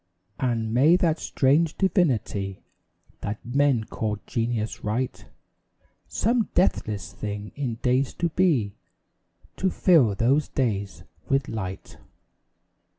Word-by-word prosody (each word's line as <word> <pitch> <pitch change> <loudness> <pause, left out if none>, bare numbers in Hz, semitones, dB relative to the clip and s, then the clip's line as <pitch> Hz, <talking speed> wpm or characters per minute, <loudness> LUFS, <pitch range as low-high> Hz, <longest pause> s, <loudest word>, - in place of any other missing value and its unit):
And 115 -4 -1
may 145 +8 +5
that 170 -3 +1
strange 150 +4 +2
divinity 120 - 0 0.6
That 105 +1 -4
men 135 -1 +2
call 110 -1 -3
Genius 115 -2 -2
write 120 +5 -2 0.8
Some 230 0 0
deathless 110 - 0
thing 105 0 -5
in 130 -5 -3
days 130 +1 +1
to 170 - 0
be, 150 - +2 0.8
To 190 - +1
fill 150 - +4
those 130 +7 +2
days 100 -7 -2 0.3
with 135 -1 +1
light. 95 -4 -6
125 Hz, 105 wpm, -25 LUFS, 110-150 Hz, 0.8 s, may